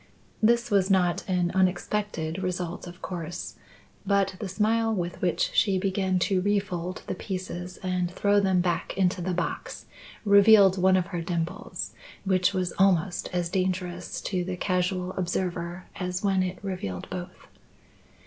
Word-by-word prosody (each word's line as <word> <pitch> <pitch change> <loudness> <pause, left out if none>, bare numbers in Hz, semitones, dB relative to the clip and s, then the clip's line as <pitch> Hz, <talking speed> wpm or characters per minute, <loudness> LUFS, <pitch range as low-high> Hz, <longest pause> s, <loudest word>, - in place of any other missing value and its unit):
This 235 +1 +3
was 195 -1 +3
not 180 -1 +2
an 180 -2 +1
unexpected 185 -2 0
result 180 -2 -3
of 175 +1 -12
course, 175 -1 -5 0.5
but 195 -2 +1
the 205 - -4
smile 225 +3 +1
with 180 -4 -3
which 180 -2 +1
she 195 -3 +3
began 190 -1 0
to 190 -2 +1
refold 185 -3 -1
the - - -3
pieces 185 -1 -5
and 180 -1 0
throw 205 +3 +2
them 190 -2 +3
back 175 +1 -1
into 185 -1 +2
the 180 +1 -1
box, - - -4 0.4
revealed 200 -1 +7
one 185 0 +5
of 180 - +1
her 175 - -1
dimples 165 0 -4 0.3
which 185 0 +3
was 185 -2 -1
almost 185 -2 +2
as 175 -1 0
dangerous 180 -1 -2
to 185 -3 -1
the 180 0 -4
casual 180 0 0
observer 175 -1 -3
as 180 0 -3
when 195 -2 +2
it 185 0 -2
revealed 180 - -4
both. 180 0 -7
185 Hz, 150 wpm, -27 LUFS, 180-195 Hz, 0.5 s, revealed